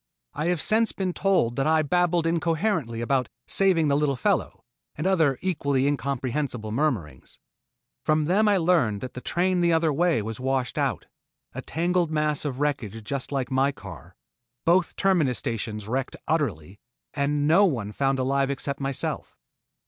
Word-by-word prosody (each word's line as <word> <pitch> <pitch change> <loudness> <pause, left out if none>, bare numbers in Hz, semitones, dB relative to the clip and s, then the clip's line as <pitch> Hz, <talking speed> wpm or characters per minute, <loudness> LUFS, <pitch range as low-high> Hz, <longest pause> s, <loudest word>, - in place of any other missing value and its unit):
I 155 - -2
have 175 -2 +1
since 225 +5 +3
been 185 -2 -2
told 180 -13 +1
that 135 - +1
I 160 0 +3
babbled 175 +1 +1
incoherently 165 - 0
about 130 0 0 0.2
"saving 185 -5 +2
the 140 - +2
little 145 -1 +1
fellow" 125 - -1 0.3
and 155 - -4
other 160 -8 +3
equally 140 -7 0
incomprehensible 135 -4 -2
murmurings. 110 - -2 0.7
From 155 -1 +2
them 200 +7 +3
I 205 -1 +4
learned 160 - +2
that 130 - -6
the 125 - -7
train 180 +4 0
the 170 0 +3
other 160 -2 +2
way 165 -6 +2
was 110 +2 -5
washed 130 +1 -1
out, 135 -7 -1 0.5
a - - -5
tangled 175 0 0
mass 150 -1 0
of 135 -3 -3
wreckage 115 -7 -2
just 135 +5 -4
like 135 -2 -2
my 135 +2 +2
car, - - -12 0.5
both 175 +1 +3
terminus 170 - +2
stations 105 -2 -4
wrecked 130 +3 -2
utterly, 100 - -2 0.3
and 145 0 0
no 180 +6 +6
one 115 - -1
found 135 +4 0
alive 135 +1 +1
except 140 0 -3
myself. 135 -1 -3
145 Hz, 160 wpm, -25 LUFS, 130-170 Hz, 0.7 s, no